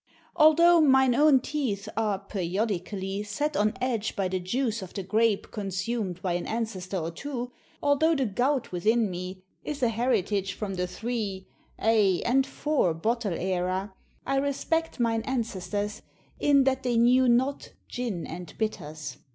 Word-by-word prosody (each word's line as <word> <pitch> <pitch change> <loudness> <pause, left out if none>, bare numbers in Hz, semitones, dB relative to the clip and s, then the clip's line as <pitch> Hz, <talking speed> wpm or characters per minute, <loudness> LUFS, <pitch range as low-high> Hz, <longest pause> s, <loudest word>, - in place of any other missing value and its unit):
Although 335 +2 +6
mine 265 -3 +5
own 285 0 +5
teeth 235 -9 -2
are, 215 -2 +1
periodically, 195 0 -3
set 290 +9 -2
on 210 -3 +2
edge 235 -4 -1
by 195 -2 0
the 185 0 -1
juice 230 +4 -1
of 185 - -9
the 195 - -3
grape 220 +2 +1
consumed 195 -2 -3
by 180 -2 0
an 175 - -2
ancestor 205 -5 -3
or 165 -1 -3
two; 250 - -5 0.3
although 300 +3 +3
the 270 -3 +1
gout 250 +6 0
within 215 +4 +2
me 185 +1 -6 0.2
is 290 -3 -4
an 235 - +3
heritage 210 -5 0
from 200 -1 -4
the 180 -1 -2
three, 205 -2 -4 0.3
aye! 210 -5 +3
and 265 +3 +3
four, 275 - 0
bottle 220 +3 -1
era, 185 +2 -1 0.3
I 275 - 0
respect 285 +3 -1
mine 225 -1 +1
ancestors, 210 -4 -3 0.4
in 280 -2 +4
that 265 0 +1
they 245 -2 0
knew 250 +2 +5
not 260 +4 +1
"gin 230 -9 -3
and 175 0 -8
bitters." 155 -8 -4
220 Hz, 150 wpm, -27 LUFS, 190-260 Hz, 0.4 s, Although